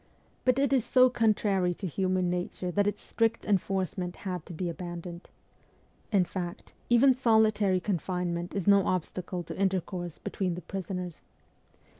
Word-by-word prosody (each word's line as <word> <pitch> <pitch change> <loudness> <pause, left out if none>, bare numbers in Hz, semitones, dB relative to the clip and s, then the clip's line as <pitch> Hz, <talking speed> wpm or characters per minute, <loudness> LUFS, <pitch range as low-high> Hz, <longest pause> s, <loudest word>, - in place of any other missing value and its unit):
But 255 -1 +4
it 275 -1 +2
is 260 -4 +3
so 255 +1 +5
contrary 205 -6 +2
to 195 - -6
human 185 +1 0
nature 180 0 -2
that 205 +3 +2
its 205 - -2
strict 230 0 0
enforcement 190 -2 -1
had 180 -4 -4
to - - -8
be 175 +2 -3
abandoned. 175 0 -6 0.8
In 195 -4 +4
fact, 175 0 -6 0.2
even 250 +3 +6
solitary 220 -6 +3
con 180 -1 -1
finement 175 0 -3
is 195 -4 -1
no 200 -1 +5
obstacle 180 0 -2
to - - -7
intercourse 185 -3 -1
between 185 -3 -2
the 180 - -6
prisoners. 180 -2 -5
185 Hz, 150 wpm, -29 LUFS, 175-210 Hz, 0.8 s, even